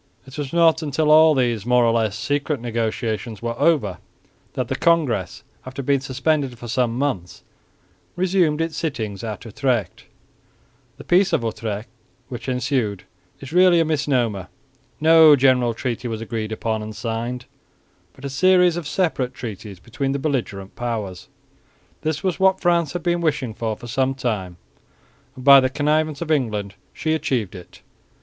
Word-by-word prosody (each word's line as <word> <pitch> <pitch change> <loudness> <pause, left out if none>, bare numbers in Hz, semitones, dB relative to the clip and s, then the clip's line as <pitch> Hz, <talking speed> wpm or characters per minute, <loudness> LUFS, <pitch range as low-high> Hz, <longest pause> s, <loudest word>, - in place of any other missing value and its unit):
It 130 0 -12
was 145 -3 -4
not 165 -1 +4
until 150 0 0
all 155 0 +7
these 120 -5 0
more 125 +1 +3
or 115 - +3
less 110 -3 0
secret 145 +3 -1
negotiations 115 -1 -3
were 115 0 -1
over 105 - +2 0.5
that - - -2
the - - -2
Congress, 140 - +1 0.2
after 130 +2 -7
being 140 +1 +2
suspended 135 0 -1
for 120 - -9
some 120 0 0
months, 115 -11 -3 0.7
resumed 175 -4 +1
its 165 -1 -2
sittings 110 - -4
at 110 0 -6
Utrecht. 115 -4 -2 0.9
The - - -10
Peace 190 +2 +3
of - - +1
Utrecht 110 0 -4 0.4
which 125 +1 -6
ensued 125 -6 -1 0.4
is 135 +3 -9
really 180 -1 +5
a 165 - +3
misnomer. 125 - 0 0.5
No 160 -1 +7
general 125 -3 +3
treaty 120 +1 -3
was 110 -2 -4
agreed 110 -1 -4
upon 110 0 -2
and 105 0 -7
signed, 115 +2 -4 0.7
but 135 - -12
a - - -3
series 180 +3 +4
of 170 -4 -5
separate 140 -8 -1
treaties 105 -5 -8
between 120 +7 -3
the - - -1
belligerent 120 -10 -3
powers. 110 -7 -4 0.7
This 155 -1 -2
was 185 -2 -1
what 190 0 +3
France 170 -4 +1
had 175 - -4
been 175 0 0
wishing 150 -8 -1
for 110 -1 -3
some 130 +2 0
time 105 -9 -3 0.8
and, 130 -1 -10
by 140 -1 +10
the 130 0 +1
connivance 150 +2 0
of 160 - -4
England, 105 -9 -1 0.2
she 155 - -2
achieved 125 - -1
it. 90 -3 -13
130 Hz, 155 wpm, -22 LUFS, 115-155 Hz, 0.9 s, by